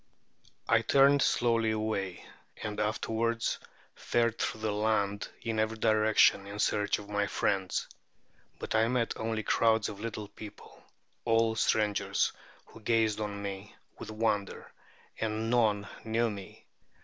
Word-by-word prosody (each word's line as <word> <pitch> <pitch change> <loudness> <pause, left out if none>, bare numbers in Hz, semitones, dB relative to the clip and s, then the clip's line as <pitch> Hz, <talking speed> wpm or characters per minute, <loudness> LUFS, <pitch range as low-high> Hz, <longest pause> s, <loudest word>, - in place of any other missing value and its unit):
I 115 - +4
turned 140 +4 +5
slowly 115 -3 +2
away, 110 -4 -2 0.4
and 105 -1 -4
afterwards 115 +2 -1 0.3
fared 115 -1 0
through 110 - -2
the 110 -1 0
land 105 -1 0
in 115 -2 -1
every 110 +1 0
direction 110 -2 +4
in 100 +1 -7
search 105 -1 +1
of 105 - -10
my 105 0 0
friends. 95 -2 -1 0.7
But - - -5
I 110 0 +3
met 120 -1 0
only 110 -1 -2
crowds 110 -1 +2
of 100 -2 -8
little 110 -1 -5
people, 105 0 -12 0.4
all 115 -1 +3
strangers, 105 -3 +1 0.3
who - - -15
gazed 110 -1 +1
on 100 -1 -4
me 100 0 -6 0.2
with - - -8
wonder; 110 -2 -2 0.5
and 110 +1 -1
none 105 -4 +2 0.2
knew 115 +1 +1
me. 100 -2 -10
110 Hz, 135 wpm, -30 LUFS, 105-115 Hz, 0.7 s, turned